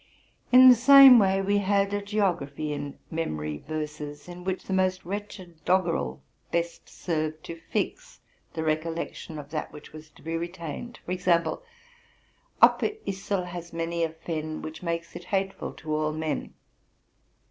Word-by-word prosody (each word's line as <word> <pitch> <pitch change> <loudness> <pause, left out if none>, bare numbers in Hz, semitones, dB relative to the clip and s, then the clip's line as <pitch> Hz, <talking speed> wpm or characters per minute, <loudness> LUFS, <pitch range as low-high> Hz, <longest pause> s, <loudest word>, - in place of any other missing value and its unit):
In 255 +1 +9
the 255 - +11
same 265 +1 +9
way 195 -1 +2
we 205 +1 +2
had 200 0 +1
a 205 - 0
geography 175 -8 -1
in 145 -1 -6
memory 75 - -3
verses, 150 -1 -5
in 180 0 -9
which 190 0 -3
the 190 - -4
most 185 -1 +1
wretched 185 -4 -7
doggerel 170 - 0 0.3
best 170 0 -2
served 155 -2 -3
to 165 0 -8
fix - - -3 0.3
the 160 - -3
recollection 160 0 -3
of 145 0 -9
that 155 -2 -4
which 150 - -13
was 155 0 -11
to - - -20
be 165 +1 -3
retained; 170 +7 -6
e.g.5— 180 - +1 0.6
'* - - -37
Upper - - +6 0.2
Yssel 195 -1 -2
has 175 -1 -8
many 165 0 -2
a 165 - +1
fen, 155 -1 -5
Which 155 0 -7
makes 170 -1 -4
it 175 - -8
hateful 195 0 -2
to 155 -1 -5
all 155 0 0
men. 155 0 -3
170 Hz, 155 wpm, -27 LUFS, 155-190 Hz, 0.6 s, the